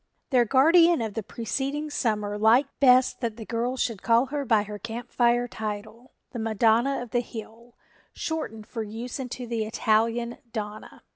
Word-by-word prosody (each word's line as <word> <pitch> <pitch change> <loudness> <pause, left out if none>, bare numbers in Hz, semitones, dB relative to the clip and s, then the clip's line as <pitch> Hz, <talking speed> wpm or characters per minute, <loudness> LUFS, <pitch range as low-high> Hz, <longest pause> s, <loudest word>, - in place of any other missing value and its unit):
Their 250 -3 +4
guardian 330 +7 +5
of 220 -2 -4
the 225 - -3
preceding 275 +8 -3
summer 210 -6 -1
liked 230 +6 +3
best 255 -2 +5
that 230 -2 -2
the 220 - -8
girls 240 +3 -2
should 220 -5 -2
call 230 +2 +3
her 285 +1 -3
by 220 -4 +3
her 210 0 -8
Camp 230 +2 -7
Fire 240 0 +2
title, 220 +2 -7 0.2
"The 240 - -5
Madonna 225 +4 +2
of 240 - -12
the 245 - +2
Hill," 235 0 -9 0.4
shortened 225 -10 -4
for 225 - -5
use 225 +5 -6
into 250 -1 -5
the 230 -2 -2
Italian 230 +2 0
"Donna." 215 -1 -7
235 Hz, 165 wpm, -26 LUFS, 220-250 Hz, 0.4 s, guardian